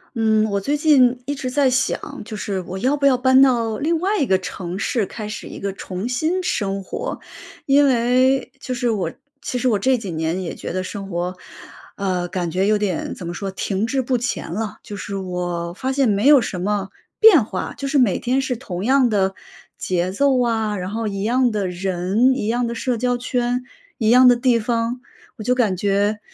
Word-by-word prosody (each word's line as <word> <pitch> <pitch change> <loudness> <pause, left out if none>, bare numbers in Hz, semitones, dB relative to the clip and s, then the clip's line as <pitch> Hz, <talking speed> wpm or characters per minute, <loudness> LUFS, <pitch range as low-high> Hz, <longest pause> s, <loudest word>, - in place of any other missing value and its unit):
嗯， 220 -1 +3
我 200 - +1
最 280 +9 -1
近 260 -5 +4
一 285 - -2
直 265 -2 -4
在 275 0 +2
想， 260 +2 -1
就 215 - -7
是 200 -2 -3
我 185 +2 -6
要 260 +9 +1
不 280 - 0
要 265 -2 +5
搬 260 +1 +5
到 235 -5 +3
另 325 +6 0
外 405 +3 +1
一 280 - +2
个 190 - +4
城 185 -1 -6
市， 220 +1 0
开 215 +2 -7
始 210 - -7
一 - - -9
个 200 - -3
重 190 +3 -5
新 320 +9 0
生 195 - -1
活。 485 - -5 0.4
因 285 +1 +5
为， 255 +2 +2
就 255 - -4
是 245 -1 0
我 195 -7 -1 0.3
其 250 - -3
实 255 +1 +1
我 210 -4 +1
这 260 +5 +2
几 205 -6 -6
年 160 +3 -2
也 170 - -4
觉 - - -6
得 185 0 -2
生 195 +1 -6
活， 180 +1 -3 0.6
呃， 185 -3 -1
感 175 -2 -3
觉 190 +4 +1
有 215 0 +3
点 205 -5 -2
怎 180 - -8
么 170 - -4
说， 195 +2 -4
停 195 +2 -2
滞 265 +3 0
不 255 0 0
前 240 -8 -3
了。 215 +4 -4
就 205 - -8
是 200 0 -5
我 175 -2 -3
发 260 +8 -3
现 270 -3 +2
没 205 +6 +2
有 290 -3 +8
什 185 -5 -4
么 200 +1 -1 0.3
变 360 - +8
化， - - -4
就 275 - -4
是 280 +1 +1
每 240 -8 +3
天 255 +2 0
是 260 -2 -2
同 185 -7 -6
样 260 +2 +4
的 195 -3 +1 0.4
节 180 0 -1
奏 265 +4 +2
啊， 220 -3 0
然 185 -1 -4
后 220 +2 -3
一 195 -1 -3
样 245 +3 +2
的 205 -3 -1
人、 190 +7 +1
一 215 -5 -2
样 240 +1 0
的 235 - -4
社 245 0 -1
交 245 +1 0
圈、 245 0 -1 0.3
一 220 -2 +1
样 250 +2 +7
的 245 - +7
地 240 -1 +2
方， 230 +2 -1 0.4
我 215 - -7
就 250 +3 +1
感 215 -7 +1
觉， 205 +2 +1
225 Hz, 230 characters per minute, -21 LUFS, 195-255 Hz, 0.6 s, 有